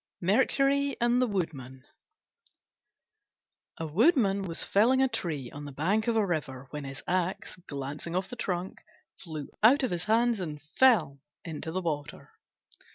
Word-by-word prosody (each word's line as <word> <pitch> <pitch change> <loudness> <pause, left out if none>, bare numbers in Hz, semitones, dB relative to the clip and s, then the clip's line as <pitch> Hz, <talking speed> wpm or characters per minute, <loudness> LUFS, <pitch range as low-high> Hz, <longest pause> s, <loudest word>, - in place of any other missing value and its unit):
MERCURY 275 +8 +2
AND 240 +1 +3
THE 255 - +3
WOODMAN 135 - -4 1.9
A 165 - -4
Woodman 200 - +3
was 170 -4 -2
felling 235 +6 +3
a 265 - +4
tree 160 - -4
on 145 +1 -8
the 145 - -7
bank 190 - 0
of 235 - +2
a 220 -2 +3
river, 140 -7 -3
when 150 -1 -5
his 135 0 -8
axe, 185 +1 -1
glancing 145 +4 -5
off 185 +1 -1
the - - -8
trunk, 185 -5 -4 0.4
flew 155 -5 -7
out 255 +6 +6
of 255 - 0
his 175 0 -2
hands 230 +1 +2
and 155 -5 -5
fell 155 - +3 0.3
into 160 -1 -5
the 185 +3 -2
water. 145 -3 -4
180 Hz, 155 wpm, -29 LUFS, 150-230 Hz, 1.9 s, out